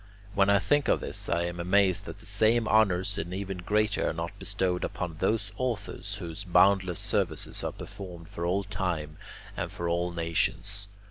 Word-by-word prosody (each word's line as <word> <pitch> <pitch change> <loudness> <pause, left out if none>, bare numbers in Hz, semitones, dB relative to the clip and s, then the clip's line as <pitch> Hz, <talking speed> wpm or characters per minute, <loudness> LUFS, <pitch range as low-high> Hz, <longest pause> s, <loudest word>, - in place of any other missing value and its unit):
When 100 -1 +4
I 100 - +6
think 145 +9 +2
of - - +3
this, - - -4
I 85 - +2
am 85 0 -4
amazed 95 +1 +3
that - - -7
the - - -16
same 110 +3 +3
honours 100 -2 +3
and 85 +2 -4
even 95 -1 -4
greater 105 +3 +1
are - - -2
not 85 +1 -3
bestowed 90 -1 -1
upon 85 -3 -3
those 105 +4 0
authors 105 -5 -3
whose 90 -1 -6
boundless 95 -1 +4
services 95 -5 0
are - - -1
performed 90 -4 -9
for 85 - -6
all 95 +3 +1
time 90 -6 -3 0.4
and - - -3
for 85 - -3
all 85 +1 +1
nations. 85 +4 -1
95 Hz, 180 wpm, -29 LUFS, 85-100 Hz, 0.4 s, I